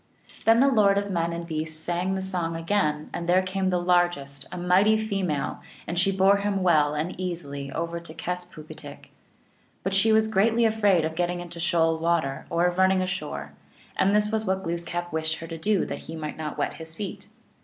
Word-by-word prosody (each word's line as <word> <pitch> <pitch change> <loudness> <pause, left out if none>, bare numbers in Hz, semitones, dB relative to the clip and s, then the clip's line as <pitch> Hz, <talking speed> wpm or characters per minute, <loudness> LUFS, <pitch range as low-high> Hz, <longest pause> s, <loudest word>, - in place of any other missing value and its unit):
Then 225 +2 +6
the 275 - +5
lord 210 -6 +4
of 200 0 -1
men 170 -2 0
and 170 0 -4
beasts 155 -1 -4
sang 175 +3 -1
the 190 - -3
song 175 -3 -2
again, 165 -3 0
and 170 0 -4
there 185 +1 +4
came 190 0 -1
the 180 - +1
largest, 175 -6 +1
a - - -6
mighty 185 +5 +4
female, 195 -9 -2 0.2
and 170 +1 -2
she 195 +2 +3
bore 195 +1 +4
him 200 -1 -1
well 150 -4 +3
and 155 +5 -2
easily 145 -7 -4
over 170 +3 -3
to 170 -2 -11
Kes 180 +2 -4
poog 155 - -10
itk. - - -11 0.7
But 190 - -1
she 195 +3 +4
was 220 0 +4
greatly 225 +3 +3
afraid 205 -7 +3
of 160 - -3
getting 175 +1 -1
into 170 -1 -7
shoal 165 -1 +2
water, 160 -5 0
or 170 +1 +2
of 180 +1 0
running 190 0 +4
ashore, 185 0 -4 0.4
and 200 +2 +3
this 210 0 +2
was 220 0 0
what 190 -2 -1
Gloos 170 0 -3
kap 175 +1 -4
wished 160 0 -1
her 165 - -8
to 165 0 -6
do 205 +2 +1
that - - -5
he 165 - -8
might 155 -1 -5
not 155 -2 -5
wet - - -1
his 160 0 -8
feet. 200 +2 -6
175 Hz, 210 wpm, -26 LUFS, 165-195 Hz, 0.7 s, Then